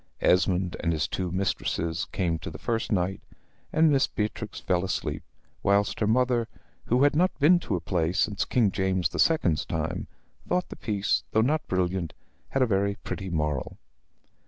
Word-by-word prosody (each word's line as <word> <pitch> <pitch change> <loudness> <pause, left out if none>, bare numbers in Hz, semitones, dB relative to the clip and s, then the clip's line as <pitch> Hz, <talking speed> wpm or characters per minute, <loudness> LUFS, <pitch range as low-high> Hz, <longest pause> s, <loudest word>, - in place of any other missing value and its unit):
Esmond 90 0 +2
and 85 -1 0
his 80 0 0
two 90 -1 -3
mistresses 85 -3 -1
came 85 -4 -1
to - - -6
the 75 - -8
first 115 +7 -2
night, 95 -1 0 0.5
and 160 0 +4
Miss 135 -1 +3
Beatrix 105 0 -4
fell 90 -1 0
asleep; 95 - -2 0.4
whilst 100 +1 +2
her 105 - +1
mother, 120 0 +2 0.4
who 125 +3 +3
had 145 0 +4
not 180 +4 +2
been 170 +5 +5
to 110 - -2
a - - -1
play 85 -1 0
since 100 +3 +1
King 115 -6 +2
James 95 -3 0
the - - -6
Second's 90 - +3
time, 80 +2 -3 0.4
thought 180 0 0
the - - -7
piece, 105 -2 0
though 110 - +4
not 150 +6 +1
brilliant, 90 -2 -1 0.4
had 135 - +2
a - - +4
very 100 -2 +1
pretty 95 -1 -4
moral. 75 -5 -2
95 Hz, 175 wpm, -27 LUFS, 90-120 Hz, 0.5 s, been